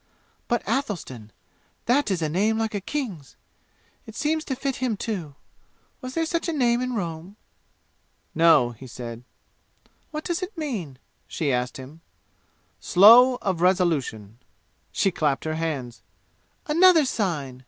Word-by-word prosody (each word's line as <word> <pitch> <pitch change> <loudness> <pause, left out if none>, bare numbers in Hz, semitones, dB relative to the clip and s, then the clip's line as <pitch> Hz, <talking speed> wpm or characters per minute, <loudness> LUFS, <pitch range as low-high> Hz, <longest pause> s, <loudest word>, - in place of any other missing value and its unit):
But, - - -1
Athelstan! 140 - -3 0.5
That 255 +1 +2
is 180 -4 -1
a - - +1
name 205 +8 +1
like 225 -1 -2
a 205 - -3
king's! 195 - -5 0.7
It 220 - -11
seems 310 +3 -1
to 265 - -3
fit 270 0 -3
him, 245 -5 -1
too! 180 -11 -5 0.7
Was 255 +1 -7
there 330 0 +1
such 335 +1 -2
a - - -1
name, 245 -4 +2
in 255 -1 -2
Rome?" 170 -1 -5 1.0
"No," 160 -7 +4
he 120 +3 -12
said. 120 -1 -8 0.9
"What 305 -1 -6
does 345 0 -2
it 370 +1 -6
mean?" 210 - -4 0.3
she 145 -4 -1
asked 125 0 -2
him. 140 +5 -11 0.8
"Slow 230 - +7
of 185 -4 -1
resolution!" 150 - 0 0.5
She 195 - +1
clapped 150 -5 -1
her 155 - -2
hands. 140 -10 -4 0.6
"Another 330 0 +5
sign!" 155 - -2
190 Hz, 140 wpm, -24 LUFS, -, 1.0 s, Slow